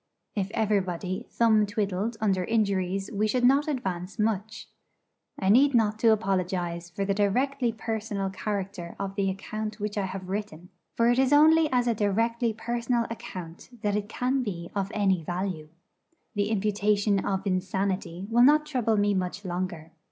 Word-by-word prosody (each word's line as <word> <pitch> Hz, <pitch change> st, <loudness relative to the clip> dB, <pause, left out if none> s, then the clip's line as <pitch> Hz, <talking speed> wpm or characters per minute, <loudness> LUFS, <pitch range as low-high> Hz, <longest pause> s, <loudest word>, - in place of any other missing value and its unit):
If 195 Hz, -2 st, -2 dB
everybody 195 Hz, -1 st, -1 dB
thumb 220 Hz, -3 st, +3 dB
twiddled 205 Hz, +1 st, -2 dB
under 195 Hz, -4 st, +1 dB
injuries 195 Hz, -2 st, 0 dB
we 210 Hz, +1 st, +1 dB
should 245 Hz, +3 st, 0 dB
not 275 Hz, +4 st, +4 dB
advance 190 Hz, -, -3 dB
much. 215 Hz, 0 st, -2 dB, 0.7 s
I 190 Hz, -, 0 dB
need 270 Hz, +5 st, +5 dB
not 215 Hz, -2 st, +2 dB
to 225 Hz, -1 st, +5 dB
apologise 180 Hz, -4 st, -1 dB
for 195 Hz, +3 st, -3 dB
the 195 Hz, -, +1 dB
directly 245 Hz, +5 st, +1 dB
personal 215 Hz, -3 st, -3 dB
character 195 Hz, -3 st, -4 dB
of 195 Hz, -1 st, -4 dB
the 195 Hz, -1 st, 0 dB
account 215 Hz, +2 st, -5 dB
which 210 Hz, 0 st, -2 dB
I 195 Hz, -, 0 dB
have 185 Hz, 0 st, -6 dB
written; 190 Hz, -3 st, -5 dB, 0.3 s
for 235 Hz, +1 st, +4 dB
it 245 Hz, -, +2 dB
is 265 Hz, 0 st, +3 dB
only 310 Hz, +2 st, +6 dB
as 250 Hz, -1 st, +2 dB
a 235 Hz, -, +2 dB
directly 225 Hz, +3 st, +1 dB
personal 235 Hz, +1 st, -1 dB
account 180 Hz, -6 st, -8 dB
that 205 Hz, -1 st, +1 dB
it 210 Hz, 0 st, -2 dB
can 255 Hz, +4 st, 0 dB
be 175 Hz, -7 st, -5 dB
of 195 Hz, -1 st, -1 dB
any 195 Hz, -4 st, +2 dB
value. 175 Hz, -2 st, -3 dB, 0.6 s
The 205 Hz, -1 st, 0 dB
imputation 205 Hz, -1 st, +1 dB
of 190 Hz, 0 st, -2 dB
insanity 190 Hz, -1 st, -1 dB
will 240 Hz, +1 st, +4 dB
not 300 Hz, +3 st, +5 dB
trouble 245 Hz, -7 st, 0 dB
me 205 Hz, 0 st, +2 dB
much 185 Hz, +1 st, -3 dB
longer. 175 Hz, -3 st, -4 dB
205 Hz, 160 wpm, -27 LUFS, 190-230 Hz, 0.7 s, only